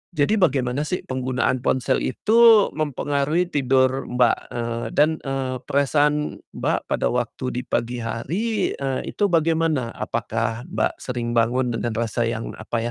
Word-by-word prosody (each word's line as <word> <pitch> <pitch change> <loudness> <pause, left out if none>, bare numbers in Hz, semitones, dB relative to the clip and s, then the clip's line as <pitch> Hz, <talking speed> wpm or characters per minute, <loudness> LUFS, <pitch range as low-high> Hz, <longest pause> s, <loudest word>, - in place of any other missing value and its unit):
jadi 155 +8 +2
bagaimana 140 -4 +1
sih 180 - -2
penggunaan 130 -1 -1
ponsel 130 0 +1
itu 225 - +5
mempengaruhi 150 +3 0
tidur 130 -1 +2
Mbak, 125 -1 +2 0.2
eee, 115 0 -3
dan, 155 +2 +3
eee, 135 -1 -2
perasaan 150 +1 +1 0.2
Mbak, - - -1
pada - - 0
waktu 125 +1 -2
di 125 - -3
pagi 120 0 -1
hari, 190 - -2
eee, 135 -1 -2
itu 205 - 0
bagaimana? 165 -7 +1
Apakah 115 0 -2
Mbak, - - -1
sering 120 -2 -3
bangun 120 +2 +1
dengan 115 0 -2
rasa 115 0 -1
yang 115 -1 -4
apa 110 +2 -3
130 Hz, 140 wpm, -23 LUFS, 120-150 Hz, 0.2 s, itu